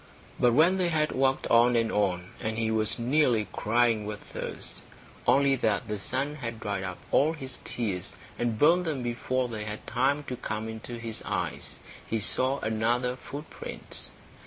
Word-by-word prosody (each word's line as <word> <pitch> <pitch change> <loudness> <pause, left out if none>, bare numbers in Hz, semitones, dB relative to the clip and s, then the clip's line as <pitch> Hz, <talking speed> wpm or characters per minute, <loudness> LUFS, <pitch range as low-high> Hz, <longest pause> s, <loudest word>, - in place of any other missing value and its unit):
But 120 -1 +5
when 170 +6 +5
they 180 -2 +2
had 155 -2 +1
walked 135 0 +2
on 120 +1 +6
and 115 -1 +2
on, 95 -3 0
and 110 0 -2
he 110 -1 +1
was 110 -1 +1
nearly 120 -3 +3
crying 115 0 +2
with 105 0 -4
thirst, - - -7 0.5
only 140 0 +5
that 110 -4 +1
the 105 -1 -3
sun 135 +9 -1
had 115 -5 -5
dried 100 -3 -2
up 95 -2 -4
all 155 +3 +4
his 135 -5 -7
tears 100 -6 -3 0.2
and 120 -2 0
burnt 170 +7 +5
them 145 -6 -2
before 125 +1 -1
they 110 -3 -4
had 105 0 -5
time 135 +4 +1
to 130 - -4
come 110 -2 -4
into 110 +2 -6
his 115 -1 -6
eyes, - - -3 0.3
he 115 - -1
saw 130 +5 +1
another 120 +3 +1
footprint. 145 +4 -7
120 Hz, 170 wpm, -28 LUFS, 110-135 Hz, 0.5 s, on